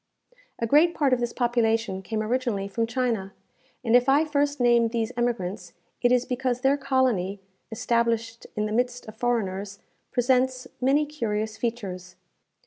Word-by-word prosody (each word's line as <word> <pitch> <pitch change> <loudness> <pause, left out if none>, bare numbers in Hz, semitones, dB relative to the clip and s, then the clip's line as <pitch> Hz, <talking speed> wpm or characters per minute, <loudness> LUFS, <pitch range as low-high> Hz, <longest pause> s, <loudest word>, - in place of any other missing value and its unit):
A 230 - -1
great 310 +8 +4
part 280 -4 +2
of 250 - +2
this 240 -1 -1
population 225 -5 0
came 215 +3 -3
originally 230 -4 -1
from 225 +3 -1
China; 230 -6 -1 0.5
and 235 -1 +3
if 245 +2 +4
I 290 +4 +4
first 290 -1 0
name 240 -1 +4
these 230 0 -2
emigrants, 200 -7 -2 0.3
it 245 - +3
is 250 0 +3
because 250 -1 -1
their 270 +2 +4
colony, 250 -9 0 0.3
established 230 0 -1
in 210 -1 0
the 215 - -3
midst 245 +2 -1
of 215 - -9
foreigners, 200 -4 -2 0.3
presents 255 +1 +1
many 280 +4 +3
curious 220 -7 -3
features. 190 -6 -4
235 Hz, 150 wpm, -26 LUFS, 215-255 Hz, 0.5 s, great